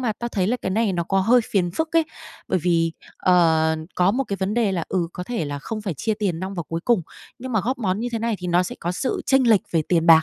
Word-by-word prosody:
mà 235 -4 0
tao 240 - -3
thấy 190 -5 0
là 245 +5 +1
cái 190 - -1
này 215 0 +1
nó 175 - 0
có 195 +2 +1
hơi 235 +6 +5
phiền 180 -4 +1
phức 320 - -2
ấy. 330 - +5 0.4
Bởi - - +2
vì, 165 -2 +2 0.2
ờ, 160 -3 +3 0.2
có 180 +2 +3
một 270 +2 0
cái 200 - -3
vấn 190 +3 -2
đề 225 -5 +2
là, 170 -3 -1
ừ, 175 -3 0
có 180 - -6
thể 235 -8 -2
là 145 -1 -4
không 215 +9 -5
phải 190 -5 -3
chia 220 - -1
tiền 195 -6 -2
nong 190 +1 -4
vào 170 - -3
cuối 165 0 -3
cùng, 235 -7 +3 0.4
nhưng 255 +1 -6
mà 220 - +2
góp 250 +5 -2
món 195 -2 -1
như 240 - -2
thế 230 - -1
này 230 0 -1
thì 180 - -6
nó 175 +1 +3
sẽ - - -5
có 175 +1 -2
sự 255 - -2
chênh 265 -2 +4
lệch 210 -5 +6
về 165 -2 +2
tiền 170 -1 +2
bạc". 160 -1 +8
190 Hz, 295 wpm, -23 LUFS, 175-230 Hz, 0.4 s, bạc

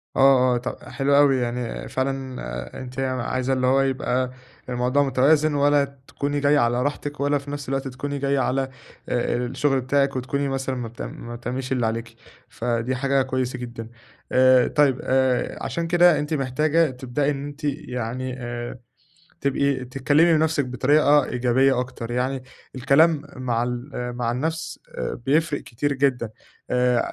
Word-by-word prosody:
آه، 130 -2 +5
آه، - - +1
ط 120 - -5
حلو 140 0 +2
أوي 140 -2 +5
يعني 120 -1 -3
فعلًا 130 -1 -3
آآ 60 +1 -6
أنتِ 130 0 -7
عايزة 130 0 -1
اللي 130 -1 +1
هو 135 +1 +4
يبقى 130 -1 0 0.4
الموضوع 125 +3 +1
متوازن 145 +3 +3
ولا 145 0 +3 0.2
تكوني 145 0 -2
جايّة 145 +1 +4
على 120 +1 +2
راحتك، 145 +1 -3
ولا 145 +1 +2
في 140 0 -8
نفْس 145 -2 -5
الوقت 135 0 -1
تكوني 140 +2 -4
جايّة 140 0 +1
على 130 +1 +1 0.5
آآ 120 -1 0
الشغل 130 +2 0
بتاعِك 140 +1 +1
وتكوني 140 +2 -1
مثلًا 135 -1 -2
ما 120 -2 -4
بت 115 +2 -10
ما 120 0 -7
بتعمليش 125 +2 -5
اللي 125 -3 +1
عليكِ، 115 +1 -3 0.3
فدي 120 +2 -1
حاجة 135 +1 +1
كويسة 130 -1 -2
جدًا، 120 -2 -7 0.4
آآ 130 0 +5
طيب 140 -4 +2
آآ 130 -1 +1
عشان 170 0 -2
كده 175 -2 +5
أنتِ 150 +2 -3
محتاجة 150 +4 +2
تبدأي 130 +3 -1
إن 140 0 -4
أنتِ 145 +1 -9
يعني 130 -3 -3
آآ، 120 0 -5 0.6
تبقي 140 -1 0
تكلّمي 145 +6 +3
نفسِك 155 -2 +2
بطريقة 145 +3 +3
إيجابية 125 +2 +2
أكتر 120 -2 -6
يعني، 130 +2 -1 0.3
الكلام 140 +4 +4
مع 120 -2 -1
ال 125 +3 -4
آآ 125 0 -3
مع 120 -1 -2
النَفْس 160 +5 -3 0.5
بيفرِق 150 +1 +2
كتير 140 +5 -2
جدًا، 130 -4 0 0.4
آآ 125 -1 +3
130 Hz, 155 wpm, -23 LUFS, 125-145 Hz, 0.6 s, آه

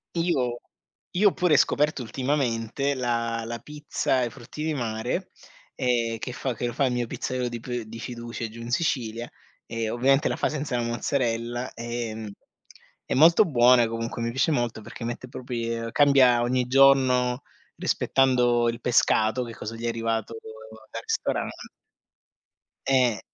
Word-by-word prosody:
Io 130 -9 0 0.5
io 205 +3 +4
ho - - -8
pure 175 -5 +3
scoperto 150 0 +2
ultimamente 130 +1 -1
la 115 -2 -1
la 115 +1 -5
pizza 150 -2 -2
ai 125 -2 +1
frutti 120 +6 -9
di 160 0 0
mare, 120 +7 -3 0.4
ehm, 120 -3 0
che 125 - -5
fa 125 +1 -3
che 120 - -4
lo 120 - -2
fa 140 - +1
il 125 - 0
mio 120 -1 -1
pizzaiolo 125 +2 -3
di 120 0 -5
p 120 +1 -4
di 110 +1 -10
fiducia 120 -1 -5
giù 115 +2 -10
in 115 +1 -6
Sicilia 120 -5 -1 0.4
e, 115 -1 -3
ovviamente, 135 +5 +3
la - - -1
fa - - +1
senza 145 -4 -2
la 120 - 0
mozzarella. 120 0 -2
Ehm, 115 -2 -5 0.8
è - - -2
molto 165 +9 +7
buona, 125 -5 +5
comunque, 115 +1 -4
mi 115 0 -1
piace 135 +6 +1
molto 120 -5 -1
perché 110 - -9
mette 120 +2 -5
propri 125 -2 -4
uhm, 115 0 -5
cambia 130 -3 +5
ogni 125 +1 +1
giorno 130 -1 +4 0.3
rispettando 125 -3 +2
il 115 +1 -5
pescato, 115 0 +2
che 115 -1 -7
cosa 110 +2 -6
gli 115 - -9
è - - +1
arrivato 115 -1 -2 0.6
dal - - -5
ristoran - - -1 1.4
Eh. 125 -6 +3
120 Hz, 160 wpm, -26 LUFS, 115-135 Hz, 1.4 s, molto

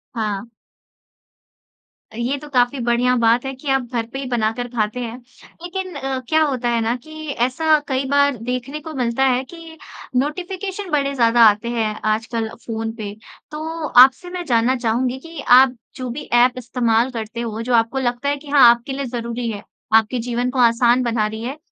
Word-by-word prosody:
हाँ। 210 -1 -3 1.7
ये 240 +5 -1
तो 300 - -11
काफ़ी 250 0 +1
बढ़िया 240 +1 +2
बात 235 +2 +3
है 270 - -3
कि 265 +3 -12
आप 270 0 +2
घर 230 -2 -1
पे 270 - -5
ही 275 - -5
बनाकर 240 0 -1
खाते 215 +1 -1
हैं। 235 -1 -5 0.5
लेकिन 370 +1 -5
अ, 270 -1 -3
क्या 315 0 +3
होता 260 -5 -1
है 235 -1 +1
ना 225 +2 0
कि 310 0 -9
ऐसा 275 +6 +2
कई 265 0 -1
बार 285 -1 +3
देखने 250 +4 -4
को 315 0 -8
मिलता 250 -1 0
है 255 -1 +2
कि 330 +3 -12 0.4
नोटिफिकेशन 370 +8 -3
बड़े 280 -2 +1
ज़्यादा 235 -1 +3
आते 210 +3 -2
हैं 225 -3 -1 0.2
आजकल 225 0 -3 0.2
फ़ोन 225 -1 -3
पे। 210 -3 -6 0.4
तो 315 +1 -4
आपसे 265 +8 +6
मैं 355 0 -5
जानना 240 -1 +2
चाहूँगी 245 +1 -1
कि 330 +3 -10
आप 255 +1 +6 0.2
जो 255 -1 -5
भी 255 +5 -5
ऐप 245 +1 +5
इस्तेमाल 240 -1 +1
करते 230 0 -5
हो 225 -1 -4
जो 245 +2 -2
आपको 230 +3 +1
लगता 245 +2 -1
है 285 - 0
कि 285 +1 -13
हाँ, 280 -4 +7
आपके 235 +3 +1
लिए 275 +1 -3
ज़रूरी 235 -1 -4
है, 205 -2 -7 0.3
आपके 225 +3 +3
जीवन 240 +1 -2
को 255 - -3
आसान 240 +1 +4
बना 230 -3 0
रही 220 +1 -6
है। 260 +5 -5
250 Hz, 190 wpm, -20 LUFS, 235-275 Hz, 1.7 s, हाँ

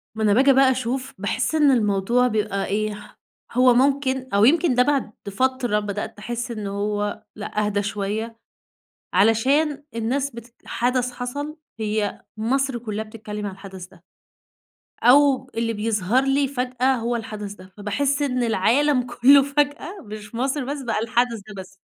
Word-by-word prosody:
ما 220 - -2
أنا 210 -1 +4
باجي 270 +4 +5
بقى 265 0 +5
أشوف 260 +1 -3
باحس 225 +9 -1
إن 295 -3 +5
الموضوع 230 +2 +2
بيبقى 210 -3 -1
إيه، 210 +1 -4 0.3
هو 250 +1 +5
ممكن 265 0 +1
أو 200 +2 +5
يمكن 320 -1 +3
ده 250 - +5
بعد 275 -5 0 0.2
فترة 250 -1 0
بدأت 205 0 -5
أحس 240 +2 -4
إنه 215 -3 -4
هو 205 0 -2
لأ 210 0 -2
أهدى 205 -1 0
شوية، 210 +3 -3 0.8
علشان 270 - +3
الناس 255 +5 -1
بتت 235 0 -12
حدث 250 +1 0
حصل 285 +5 -5 0.2
هي 215 -1 -2
مصر 260 +3 0
كُلّها 220 -2 -4
بتتكلّم 210 -1 -7
عن 195 - -4
الحدث 190 -2 -10
ده. 180 -2 -22 1.0
أو 265 +1 +5
اللي 230 0 -1
بيظهر 215 +2 +1
لي 275 +1 +2
فجأة 255 0 0
هو 235 0 -1
الحدث 210 -3 -6
ده، 185 -2 -14
فباحس 275 +8 -1
إن 255 -3 0
العالم 250 +6 +2
كُلّه 275 +4 +6
فجأة 290 +6 -1
مش 215 +1 -10
مصر 265 +3 -1
بس، 280 +2 -4
بقى 235 -4 -1
الحدث 235 0 0
ده 210 - -9
بس. 185 - -16
235 Hz, 155 wpm, -23 LUFS, 210-265 Hz, 1.0 s, كُلّه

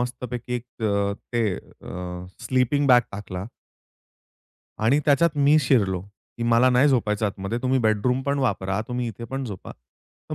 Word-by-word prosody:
मस्तपैकी 125 0 -4
एक 120 -1 -7
अ, 100 -1 +1 0.2
ते 115 -5 +1
अ, 90 0 -8 0.2
स्लीपिंग 130 +3 +2
बॅग 125 -2 +7
टाकला. 95 -2 -6 1.3
आणि 120 +7 +3
त्याच्यात 150 +2 +3
मी 145 +2 +5
शिरलो, 105 -9 +2
की 100 +4 -12
मला 120 +2 +4
नाही 125 +4 +4
झोपायचं 110 -5 +1
आतमध्ये 100 +3 -3
तुम्ही 130 +1 +2
बेडरूम 110 +3 +1
पण 140 +1 0
वापरा, 100 -6 0
तुम्ही 125 -1 -2
इथे 115 +2 -8
पण 135 +3 -4
झोपा. 100 -6 -7
तर 60 +1 -14
120 Hz, 150 wpm, -24 LUFS, 100-130 Hz, 1.3 s, बॅग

